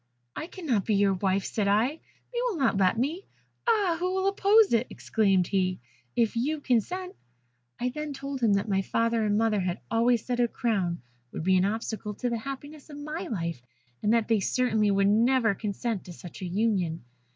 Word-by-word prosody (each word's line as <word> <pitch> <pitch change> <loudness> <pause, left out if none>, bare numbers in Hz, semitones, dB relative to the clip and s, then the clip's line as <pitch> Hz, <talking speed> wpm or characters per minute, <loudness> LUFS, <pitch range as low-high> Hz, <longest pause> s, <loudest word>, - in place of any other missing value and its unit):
'I 315 - -5
cannot 280 - -1
be 215 - +1
your 200 -1 +3
wife,' 190 +1 0
said 210 -3 -1
I: 210 +4 +4 0.5
'they 475 - -1
will 430 -8 -2
not 270 -7 +2
let 190 +2 +3
me.' 310 - -2 0.4
'Ah! 410 -7 +3
who 365 +1 0
will 380 0 +1
oppose 400 - +4
it,' 230 +2 +2
exclaimed 195 -5 +1
he, 185 -1 0 0.4
'if 230 -2 +1
you 295 +7 0
consent?' 360 - -1 0.6
I 250 - 0
then 300 +3 -5
told 275 -1 -5
him 225 -3 +4
that 200 +2 0
my 195 -2 +1
father 230 +3 0
and 210 -1 +1
mother 220 -2 +2
had 180 -1 -2
always 230 0 +2
said 245 -1 -2
a 240 - +4
crown 190 - -1 0.3
would - - -5
be 190 +2 +3
an 185 0 +3
obstacle 210 0 -3
to 245 +3 -2
the 235 - -1
happiness 280 +4 -8
of 290 - -9
my 305 +5 -5
life, 170 - -3 0.4
and 210 - +2
that 230 -2 +2
they 225 -2 +3
certainly 220 0 +1
would 195 0 +3
never 230 +1 +3
consent 210 +1 -3
to 175 - -9
such 175 +2 -11
a - - -3
union. 180 - 0
225 Hz, 195 wpm, -27 LUFS, 200-275 Hz, 0.6 s, I